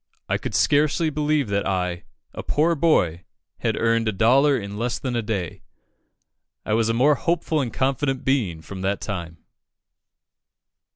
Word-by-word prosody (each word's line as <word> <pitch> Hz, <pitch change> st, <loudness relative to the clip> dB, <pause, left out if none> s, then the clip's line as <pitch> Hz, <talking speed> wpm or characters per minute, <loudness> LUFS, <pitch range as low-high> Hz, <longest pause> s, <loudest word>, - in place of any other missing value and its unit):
I -, -, 0 dB
could -, -, -5 dB
scarcely 155 Hz, +2 st, +2 dB
believe 150 Hz, -2 st, 0 dB
that 100 Hz, 0 st, 0 dB
I, 90 Hz, -2 st, -2 dB, 0.3 s
a -, -, -5 dB
poor 160 Hz, +3 st, +1 dB
boy, 90 Hz, -, +2 dB, 0.4 s
had -, -, -1 dB
earned 115 Hz, 0 st, +1 dB
a -, -, +2 dB
dollar 130 Hz, +8 st, +4 dB
in 100 Hz, -2 st, -6 dB
less 120 Hz, +1 st, -1 dB
than 125 Hz, -2 st, -4 dB
a 120 Hz, -, +1 dB
day. 100 Hz, -6 st, -4 dB, 1.0 s
I 105 Hz, -, -1 dB
was 115 Hz, 0 st, +2 dB
a 115 Hz, -, +1 dB
more 140 Hz, +5 st, +4 dB
hopeful 165 Hz, 0 st, 0 dB
and 120 Hz, -4 st, -3 dB
confident 135 Hz, 0 st, -1 dB
being 105 Hz, -, 0 dB
from 95 Hz, +3 st, -8 dB
that 95 Hz, +1 st, -1 dB
time." 85 Hz, -5 st, -5 dB
115 Hz, 160 wpm, -23 LUFS, 100-145 Hz, 1.0 s, dollar